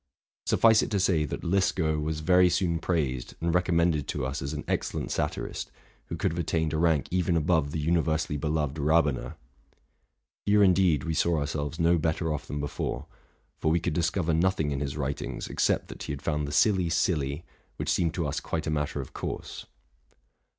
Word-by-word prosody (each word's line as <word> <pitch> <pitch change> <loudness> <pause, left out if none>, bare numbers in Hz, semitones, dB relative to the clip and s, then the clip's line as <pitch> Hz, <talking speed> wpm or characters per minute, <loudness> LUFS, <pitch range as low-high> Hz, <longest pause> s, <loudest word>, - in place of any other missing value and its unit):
Suffice 110 -1 +5
it - - -2
to 100 - 0
say, 85 -5 +2
that - - -5
Liskow 85 -4 +1
was 75 +1 -2
very 90 +2 +5
soon 85 -2 +1
praised 70 -8 -2
and 85 0 0
recommended 85 -4 +2
to 70 -3 -2
us 65 +3 -3
as 70 +1 -3
an 75 -1 -4
excellent - - -2
satirist, - - -3 0.4
who - - -4
could - - 0
have 85 - -4
attained 80 -2 0
a 80 - 0
rank 80 -4 +2
even 90 -1 +1
above 80 -2 +2
the 75 - -4
universally 80 -1 +1
beloved 75 0 -1
Ra 80 +3 +4
bener. 70 -4 -3 1.1
Here, 105 0 +4
indeed, 90 -6 +4
we 80 - -2
saw 85 +2 +2
ourselves 75 +1 -3
no 85 0 +3
better 80 +1 0
off 75 - -5
than 75 - -4
before; 70 0 -3 0.5
for - - +1
we 85 +2 +3
could - - -2
discov 85 +1 0
er 80 - +2
nothing 80 -3 +1
in 70 - -2
his 70 0 -3
writings, 70 -1 -3
except - - 0
that - - -9
he - - -4
had 70 0 -6
found 75 -2 -1
the - - -5
silly, 90 +2 +3
silly, 75 -4 0 0.3
which - - -3
seemed 85 -1 +1
to 85 - -1
us 70 - -2
quite: 80 0 -3
matter 75 -1 -1
of 65 - -10
course. - - -6
80 Hz, 190 wpm, -28 LUFS, 75-85 Hz, 1.1 s, Suffice